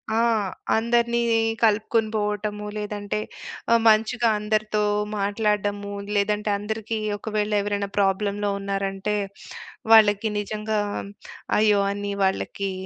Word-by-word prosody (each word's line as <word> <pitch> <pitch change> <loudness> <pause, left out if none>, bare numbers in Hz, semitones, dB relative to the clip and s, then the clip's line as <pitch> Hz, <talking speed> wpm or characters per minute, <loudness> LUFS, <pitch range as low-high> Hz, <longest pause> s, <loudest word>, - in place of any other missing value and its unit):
ఆ! - - +2 0.6
అందరిని 235 +1 +2 0.4
కలుపుకొని 220 0 +2
పోవటము. 210 0 -2
లేదంటే 210 0 -3 0.5
ఆ - - +7
మంచిగా 225 +2 +3
అందరితో 215 0 0 0.4
మాట్లాడడము. 205 0 -1 0.2
లేదంటే 210 +1 +1
అందరికీ 220 +2 -4 0.2
ఒకవేళ 210 0 -2
ఎవరైనా 200 0 -2
ప్రాబ్లమ్‌లో 205 +1 +1
ఉన్నారంటే, 195 +1 -2 0.8
వాళ్ళకి 215 -1 +6
నిజంగా 215 +1 -2 0.8
అయ్యో! 210 -1 +4
అని 205 0 -4
వాళ్ళకి 195 +1 -1
210 Hz, 95 wpm, -24 LUFS, 205-215 Hz, 0.8 s, ఆ